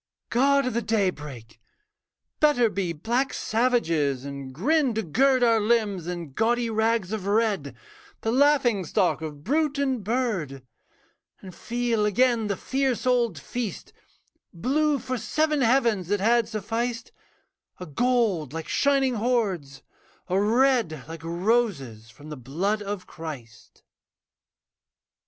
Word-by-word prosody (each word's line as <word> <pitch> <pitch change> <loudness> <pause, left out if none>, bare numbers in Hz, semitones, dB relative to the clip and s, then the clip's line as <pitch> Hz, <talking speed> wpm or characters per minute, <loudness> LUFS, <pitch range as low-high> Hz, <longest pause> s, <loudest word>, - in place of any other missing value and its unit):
God 275 +3 +3
of 255 - -2
the 235 - 0
daybreak! 150 - -3 0.8
Better 245 -7 +3
be 185 -3 -2
Black 235 - -1
savages; 165 - 0
and 140 -1 -7
grin 260 - +1
to 220 - -1
gird 255 - +2
Our 230 -2 +4
limbs 210 -5 0
in 170 -5 -5
gaudy 235 - +1
rags 220 -3 0
of 210 -3 -4
red, 200 - 0 0.5
The 225 - -1
laughing 260 -6 +3
stock 160 - 0
of 150 -2 -7
brute 295 - 0
and 265 -5 -1
bird; 190 - -2 0.8
And 185 -2 -10
feel 235 +2 -1
again 235 +1 +2
the 200 -2 -2
fierce 265 -2 -1
old 240 -8 +2
feast, 225 +8 -6 0.6
Blue 285 - +1
for 255 0 -4
seven 305 +5 0
heavens 230 -7 +2
that 205 +2 0
had 230 +3 +3
sufficed, 230 - -3 0.7
A 180 - -6
gold 195 - 0
like 165 -1 -5
shining 275 -2 +2
hoards, 205 - -1 0.4
a 190 +2 +1
red 225 - +2
Like 165 0 -8
roses 170 - -1
from 145 +6 -14
the 150 - -7
blood 175 - -2
of 200 -2 -5
Christ. 130 -8 -10
220 Hz, 130 wpm, -25 LUFS, 165-245 Hz, 0.8 s, Our